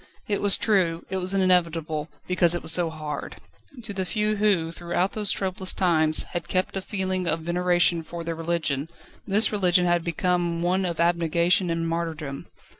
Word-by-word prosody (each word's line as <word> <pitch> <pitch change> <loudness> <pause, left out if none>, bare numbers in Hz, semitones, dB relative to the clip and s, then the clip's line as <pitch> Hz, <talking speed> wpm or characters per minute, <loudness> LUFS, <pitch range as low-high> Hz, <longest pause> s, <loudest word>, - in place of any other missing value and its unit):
It 205 - -1
was 205 -1 +4
true, 180 -6 +1
it 190 - -1
was 185 +1 0
inevitable, 165 -4 +1 0.2
because 175 -2 +2
it 175 - -4
was 160 - +4
so 170 0 +3
hard. 155 -2 -6 0.5
To 210 -2 -6
the 190 -1 -2
few 210 +2 -1
who, 195 -6 +1
throughout 175 +3 -2
those 210 -2 -1
troublous 190 0 -2
times, 160 -4 +4
had 175 - -4
kept 185 +1 -1
a 195 - -1
feeling 185 -2 -2
of 165 -1 0
veneration 175 0 +1
for 170 +1 -8
their 165 0 -3
religion, 165 -3 -2 0.4
this 210 +3 +3
religion 180 -3 +2
had 175 -1 +1
become 170 0 -1
one 185 +2 +1
of 170 -2 -3
abnegation 170 +1 +2
and 165 0 -1
martyrdom. 160 -4 -4
175 Hz, 175 wpm, -25 LUFS, 165-185 Hz, 0.5 s, was